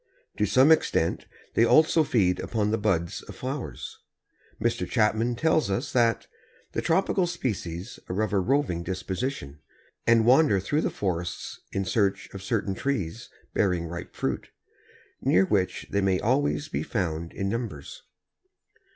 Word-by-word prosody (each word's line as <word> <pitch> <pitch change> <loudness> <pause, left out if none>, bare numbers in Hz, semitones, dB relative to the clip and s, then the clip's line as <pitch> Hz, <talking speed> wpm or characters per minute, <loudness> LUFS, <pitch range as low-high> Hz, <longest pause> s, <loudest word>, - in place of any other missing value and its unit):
To - - +2
some 135 +4 +5
extent 85 - +2 0.3
they 115 - +4
also 155 +6 +5
feed 95 -10 +2
upon 105 -2 -1
the 110 - +1
buds 85 -5 0
of - - -11
flowers. 130 +1 -5 0.6
Mr. - - -1
Chapman 110 +3 +2
tells 160 0 +2
us 95 - -2
that 115 -2 +2 0.5
"the - - -2
tropical 185 +1 +2
species 100 - -4
are 90 - -2
of 110 - -2
a 100 - +3
roving 125 -4 +1
disposition, 95 - -4 0.5
and 115 -1 +5
wander 130 -4 +5
through 145 +11 0
the - - 0
forests 90 -3 -3
in 95 0 -1
search 100 +1 0
of 100 - -7
certain 100 -1 -1
trees 115 -3 -3 0.2
bearing 90 -4 +1
ripe 85 +1 -7
fruit, - - -3 0.7
near 95 +1 +4
which 95 -2 0
they 100 - +1
may 95 -1 +2
always 145 +5 +1
be - - -3
found 85 -5 -2
in 95 - -3
numbers." 100 - -5
105 Hz, 145 wpm, -26 LUFS, 90-130 Hz, 0.7 s, some